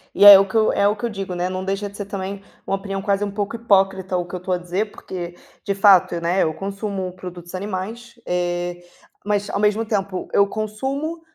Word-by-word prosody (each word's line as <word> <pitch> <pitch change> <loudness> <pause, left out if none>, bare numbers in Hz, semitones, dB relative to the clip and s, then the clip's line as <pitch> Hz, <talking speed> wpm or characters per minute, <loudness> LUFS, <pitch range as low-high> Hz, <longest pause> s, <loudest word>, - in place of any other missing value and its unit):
e 205 - +5
é 200 -1 +13
o 195 - +2
que 195 - -9
eu 220 -1 +4
é 200 - +3
o 210 - +2
que 215 - -12
eu - - -1
digo, 195 -3 -5
né, 175 +1 -1
não 185 0 -4
deixa 195 +2 -2
de 200 - -12
ser 205 -1 -5
também 195 0 -5 0.2
uma 195 - 0
opinião 195 0 -5
quase 200 0 +1
um 205 - -1
pouco 205 +2 -3
hipócrita 195 -4 +2
o 175 - -2
que 175 - -13
eu 180 - -3
estou 180 +1 -5
a - - -2
dizer, 180 +4 -2
porque 175 -1 -7 0.3
de 200 - -1
fato, 190 -4 +5
né, 175 +3 +1
eu 160 - +2
consumo 195 -1 -4
produtos 180 -1 -9
animais, 210 +5 -5
eh, 175 0 -2 0.4
mas 205 0 0
ao - - -2
mesmo 210 +2 +2
tempo 195 -4 -2
eu 200 - +5
consumo, 265 +11 -3
195 Hz, 225 wpm, -21 LUFS, 185-205 Hz, 0.4 s, é